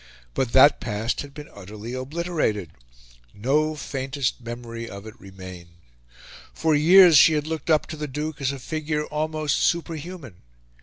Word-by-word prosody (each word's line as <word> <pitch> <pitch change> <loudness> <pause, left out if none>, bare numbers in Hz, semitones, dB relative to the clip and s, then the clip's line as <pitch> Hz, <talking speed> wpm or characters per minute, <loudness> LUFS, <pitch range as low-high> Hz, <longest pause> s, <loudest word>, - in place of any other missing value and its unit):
But 130 -3 -1
that 140 +3 +7
past 115 +1 -2
had 145 - -9
been 150 +1 -10
utterly 105 +4 -9
obliterated 130 - -2 0.6
no 150 +8 +1
faintest 135 -3 -3
memory 115 0 -7
of 100 +1 -9
it 110 - -9
remained. 95 -3 -11 0.9
For 160 -1 +1
years 170 +1 +7
she 160 - +6
had 150 -1 0
looked 160 0 -5
up 155 -2 +3
to 155 - -8
the 150 0 -4
Duke 150 +2 -5
as 135 -1 +1
a 140 - -6
figure 150 +2 -3
almost 155 0 -1
superhuman. 165 - -2
145 Hz, 150 wpm, -24 LUFS, 115-155 Hz, 0.9 s, that